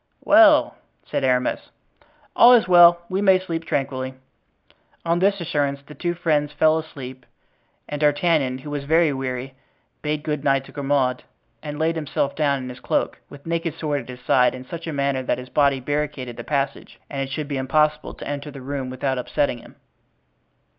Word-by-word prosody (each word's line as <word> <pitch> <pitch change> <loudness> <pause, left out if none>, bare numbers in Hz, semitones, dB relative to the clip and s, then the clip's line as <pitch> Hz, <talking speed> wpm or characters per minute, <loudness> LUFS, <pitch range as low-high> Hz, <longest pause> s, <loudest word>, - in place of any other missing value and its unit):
"Well!" 310 -1 +6 0.3
said - - -3
Aramis. 125 -1 0 0.7
"All 245 +1 +8
is 235 -5 +4
well; 175 -1 +7
we 190 +2 -2
may 190 -2 +5
sleep 165 -3 -5
tranquilly." 130 -3 -2 0.9
On 170 +1 +1
this 200 +2 +2
assurance 145 -5 -1
the 150 - -12
two 175 +2 -3
friends 150 -4 0
fell 155 +2 +3
asleep; 130 -5 -9 0.6
and 145 0 -5
D'Artagnan, 145 -3 +2
who 145 +3 -9
was 145 -1 -3
very 160 0 +3
weary, 130 0 -4 0.5
bade 150 0 -2
good 150 -2 -3
night 135 -2 +2
to - - -14
Grimaud 135 -3 0 0.4
and 150 -1 -6
laid 160 +2 0
himself 145 -2 -2
down 140 -3 0
in 125 - -6
his 125 0 -9
cloak, - - -1
with 140 -1 -13
naked 165 -1 -2
sword 150 -3 -2
at 120 - -15
his 125 0 -9
side, 125 +1 +3
in 130 0 -9
such 170 +4 -8
a - - -2
manner 140 -2 0
that 130 - -1
his 125 0 -9
body 140 -2 +2
barricaded 145 -2 -3
the - - -7
passage, 140 -2 -3
and 140 -1 -4
it 135 - -3
should 150 +1 -4
be 140 -2 -3
impossible 150 +4 0
to - - -9
enter 145 +1 -4
the 140 -1 -10
room 135 0 -4
without 130 0 -2
upsetting 125 0 -1
him. - - -16
145 Hz, 185 wpm, -22 LUFS, 135-160 Hz, 0.9 s, All